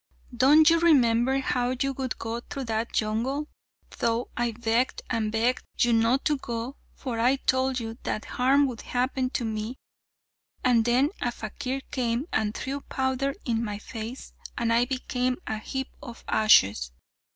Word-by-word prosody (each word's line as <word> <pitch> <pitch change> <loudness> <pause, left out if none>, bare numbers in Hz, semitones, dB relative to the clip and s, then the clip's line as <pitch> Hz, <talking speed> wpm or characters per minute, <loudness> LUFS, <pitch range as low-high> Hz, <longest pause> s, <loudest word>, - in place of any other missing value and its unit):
Don't 295 +6 +6
you 335 - +4
remember 260 -6 +4
how 250 -1 0
you 275 0 0
would 260 -1 -3
go 225 +1 -4
through 270 +3 -6
that 225 -1 -2
jungle, 240 +8 -1 0.5
though 230 +1 0
I 240 0 0
begged 235 +2 0
and 220 -3 0
begged 230 +3 +1 0.2
you 240 -1 +3
not 230 +4 +2
to 295 - +2
go, 235 +2 -5 0.2
for 240 -4 -4
I 250 +4 +4
told 260 -1 +1
you 225 0 -6
that 215 - -3
harm 270 +3 +3
would 245 -5 -4
happen 255 +1 -1
to 250 -2 -2
me, 220 +3 -3 0.9
and 240 -3 +4
then 255 +5 +3
a 240 - 0
fakir 255 +4 -4
came 245 0 -1
and 215 -1 0
threw 275 +2 -4
powder 265 +1 -1
in 230 -2 0
my 210 -2 -3
face, 225 +3 -7 0.2
and 230 -1 +1
I 235 +1 +4
became 255 -1 -1
a 220 - -3
heap 265 +4 -4
of 240 -5 -10
ashes. 100 - +4
245 Hz, 160 wpm, -27 LUFS, 230-265 Hz, 0.9 s, Don't